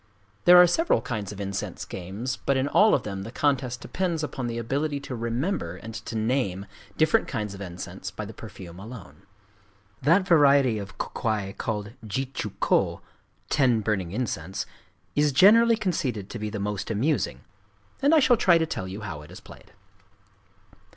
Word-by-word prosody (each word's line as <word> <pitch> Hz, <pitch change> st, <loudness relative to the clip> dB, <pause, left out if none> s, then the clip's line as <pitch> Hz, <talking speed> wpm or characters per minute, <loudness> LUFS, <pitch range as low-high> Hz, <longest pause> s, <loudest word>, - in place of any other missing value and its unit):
There 180 Hz, 0 st, +9 dB
are 180 Hz, -, +10 dB
several 325 Hz, -, +2 dB
kinds 105 Hz, -5 st, -4 dB
of 105 Hz, -, -9 dB
incense 100 Hz, -1 st, -4 dB
games; 100 Hz, +9 st, -5 dB
but 140 Hz, -, +3 dB
in 130 Hz, +1 st, +1 dB
all 210 Hz, +8 st, +5 dB
of -, -, -1 dB
them 100 Hz, -2 st, -5 dB
the 110 Hz, +4 st, -7 dB
contest 130 Hz, -3 st, 0 dB
depends 175 Hz, -4 st, -2 dB
upon 130 Hz, -4 st, -3 dB
the 115 Hz, 0 st, -3 dB
ability 140 Hz, +5 st, -1 dB
to 130 Hz, -, -6 dB
remember 115 Hz, -, -2 dB
and 110 Hz, +4 st, -9 dB
to 110 Hz, +1 st, -6 dB
name 110 Hz, -4 st, 0 dB, 0.3 s
different 155 Hz, -1 st, +3 dB
kinds 105 Hz, -2 st, -3 dB
of 100 Hz, -, -9 dB
incense 90 Hz, 0 st, -6 dB
by 105 Hz, +2 st, -6 dB
the 110 Hz, -, -9 dB
perfume 95 Hz, -6 st, -10 dB
alone. 105 Hz, -2 st, -10 dB, 0.8 s
That 175 Hz, +7 st, +3 dB
variety 140 Hz, -, +5 dB
of 100 Hz, -2 st, -9 dB
kō -, -, -4 dB
kwai 105 Hz, -4 st, -1 dB
called 105 Hz, -1 st, -4 dB
Jitchū 130 Hz, +6 st, -3 dB
kō -, -, +1 dB, 0.5 s
("ten 125 Hz, -6 st, +3 dB
burning 100 Hz, -5 st, -1 dB
incense") 95 Hz, -5 st, -3 dB, 0.5 s
is 150 Hz, 0 st, +3 dB
generally 225 Hz, -, +6 dB
conceded 130 Hz, -, -2 dB
to 120 Hz, -, -5 dB
be 105 Hz, 0 st, -3 dB
the 105 Hz, 0 st, -5 dB
most 100 Hz, 0 st, -3 dB
amusing; 110 Hz, -, 0 dB, 0.6 s
and 290 Hz, +4 st, +5 dB
I -, -, +7 dB
shall 250 Hz, -3 st, +5 dB
try 175 Hz, -5 st, +5 dB
to 165 Hz, -, +1 dB
tell 95 Hz, -11 st, -4 dB
you 95 Hz, +3 st, -7 dB
how 80 Hz, -8 st, -6 dB
it 75 Hz, -, -13 dB
is -, -, -10 dB
played. -, -, -15 dB
115 Hz, 175 wpm, -26 LUFS, 100-145 Hz, 0.8 s, are